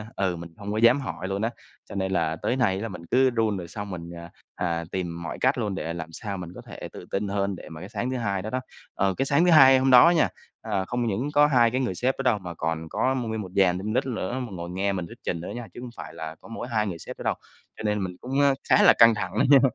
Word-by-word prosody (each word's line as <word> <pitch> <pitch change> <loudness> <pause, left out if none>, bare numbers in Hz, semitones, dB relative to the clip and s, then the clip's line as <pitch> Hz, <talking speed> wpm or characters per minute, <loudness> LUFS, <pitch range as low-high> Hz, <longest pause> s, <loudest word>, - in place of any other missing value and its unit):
ơ, 95 -1 +1
ừ, - - -4
mình 85 0 -8
không 100 0 -6
có 105 - -2
dám 120 +4 +5
hỏi 95 -8 -5
luôn 100 +1 -2
á. 115 - +1 0.4
Cho - - -8
nên 95 -1 -1
là 80 -4 +1
tới 85 - -1
nay 115 -8 +2
á 95 - -4
là 115 - -3
mình 90 -4 -9
cứ 130 +1 +5
run, 110 -4 0
rồi 90 -2 -6
xong 105 +4 -6
mình, 85 -3 -6
ờ, 85 0 -9 0.3
à, 85 -1 -1
tìm 85 -2 -4
mọi 85 - -5
cách 130 +3 +3
luôn 105 -5 -2
để 85 -3 -3
làm 85 -1 -6
sao 100 +4 -5
mình 90 -2 -6
có - - -8
thể - - -9
tự - - -9
tin 100 +1 -1
hơn, 100 0 -1
để - - -11
mà 80 - -9
cái 95 - -8
sáng 120 +3 -3
thứ 130 - -2
Hai 100 -5 -1
đó 105 - -5
đó, 130 - -1 0.3
ờ, 95 0 +1
cái 135 - +1
sáng 145 +5 +3
thứ 180 - +5
Hai 135 -4 +8
hôm 130 0 +2
đó 125 +6 +9
nha, 170 -3 +3 0.3
ờ, 95 -1 -2
không 120 +3 -1
những 115 +7 -1
có 145 0 +6
2 120 -5 +4
cái 130 +2 0
người 120 -8 -1
sếp 125 +8 0
đó - - -1
đâu, 105 - -1
mà 90 -2 -7
còn 80 0 -3
có 130 +9 +1
m 130 - -1
nguyên 110 -1 -2
một 95 -3 -8
dàn 95 -2 +4
team 105 +3 -3
lead 125 - +1
nữa, 120 -1 -3
mà 125 - -4
ngồi 85 -2 -6
nghe 95 +3 -1
mình 90 -3 -3
thuyết - - -12
trình 85 - -2
nữa 85 - -6
nha, 120 -2 -6
chứ - - -9
hông 125 - -7
phải - - -8
là 80 0 -6
có - - -14
mỗi 115 +1 -6
2 110 -3 0
người 85 -4 -5
sếp - - -8
đó - - -8
đâu, - - +1 0.4
cho - - -7
nên 105 -2 0
mình 90 -1 -5
cũng, 135 +3 0
a, 140 -1 +5 0.2
khá - - +6
là - - +8
căng 115 -1 +8
thẳng 95 -4 -3
đó - - +4
nha. 140 -1 +9
100 Hz, 315 wpm, -26 LUFS, 90-125 Hz, 0.4 s, đó